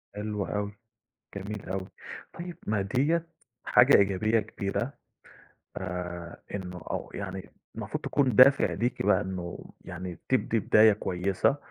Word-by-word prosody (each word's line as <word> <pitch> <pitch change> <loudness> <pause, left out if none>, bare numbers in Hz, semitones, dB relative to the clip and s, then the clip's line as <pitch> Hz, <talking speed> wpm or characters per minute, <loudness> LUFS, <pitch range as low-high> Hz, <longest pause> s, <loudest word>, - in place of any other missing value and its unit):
حلو 105 -1 -3
أوي، 105 0 -2 0.7
جميل 100 +1 -6
أوي، 95 0 -3 0.4
طيب 175 -1 -7
ما 105 -2 +1
ديّة 145 +12 +1 0.4
حاجة 125 +3 +6
إيجابية 100 +3 +3
كبيرة، 105 +6 -3 0.9
آآ، 90 -2 -5
إنه 90 -2 -6
أو - - -4
يعني 95 -1 -6 0.3
المفروض - - -5
تكون 130 -5 +1
دافع 135 +3 +7
ليكِ 120 +2 -1
بقى 105 - +4
إنه 95 -3 -6
يعني 90 -2 -7
تبدي 125 -3 +2
بداية 110 +1 +6
كويسة، 95 +6 0
100 Hz, 125 wpm, -28 LUFS, 95-115 Hz, 0.9 s, دافع